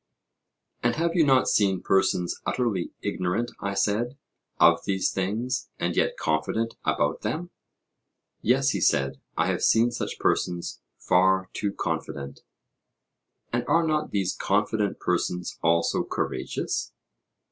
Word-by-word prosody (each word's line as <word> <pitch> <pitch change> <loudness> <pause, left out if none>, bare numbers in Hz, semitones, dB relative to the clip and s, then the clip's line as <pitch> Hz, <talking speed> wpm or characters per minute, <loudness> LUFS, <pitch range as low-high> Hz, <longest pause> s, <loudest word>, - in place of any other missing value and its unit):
And 120 0 +1
have 165 +1 0
you 170 - +4
not 135 -3 +4
seen 95 -3 +2
persons 95 -2 +1
utterly 115 -8 -1
ignorant, 95 +7 -1
I 100 -1 -3
said, 110 +6 0 0.4
of - - +6
these 95 -1 +1
things, 110 +7 -2
and - - -1
yet - - +1
confident 80 +9 -1
about - - 0
them? 175 +3 -3 0.9
Yes, 135 +3 +3
he - - -2
said, 70 -1 +1 0.2
I - - +3
have - - -2
seen 115 +2 +4
such 120 - -4
persons 85 -1 -1 0.2
far 95 +1 +2
too 100 - -1
confident. 70 -7 -4 1.1
And 120 0 +1
are 165 0 +3
not 155 -1 0
these 95 -3 -1
confident 105 0 0
persons 90 0 -1
also 85 0 +2
courageous? 65 - -3
100 Hz, 125 wpm, -26 LUFS, 90-120 Hz, 1.1 s, of